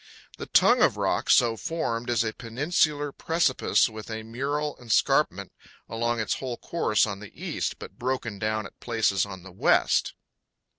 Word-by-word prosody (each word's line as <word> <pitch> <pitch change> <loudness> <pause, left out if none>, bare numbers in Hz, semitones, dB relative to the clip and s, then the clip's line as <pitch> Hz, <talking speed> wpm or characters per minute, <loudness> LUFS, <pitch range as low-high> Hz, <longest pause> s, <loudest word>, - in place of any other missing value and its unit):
The - - -6
tongue - - +5
of - - +4
rock - - -1
so 120 -2 +5
formed 120 - -3
is 120 -2 +2
a 110 -1 -3
peninsular 145 +4 0
precipice 160 -3 +2
with 110 -1 -9
a 110 0 -5
mural 140 +6 -3
escarpment 115 -4 +1 0.4
along 115 +1 -1
its 110 - -1
whole 125 -3 -4
course 135 -11 +1
on 100 -2 -5
the 105 -1 -11
east, - - -3
but - - -11
broken 120 -5 -3
down 110 0 -1
at - - -13
places 110 -5 +1
on 95 -2 -9
the 95 - -11
west. 90 - +2
115 Hz, 160 wpm, -26 LUFS, 110-135 Hz, 0.4 s, tongue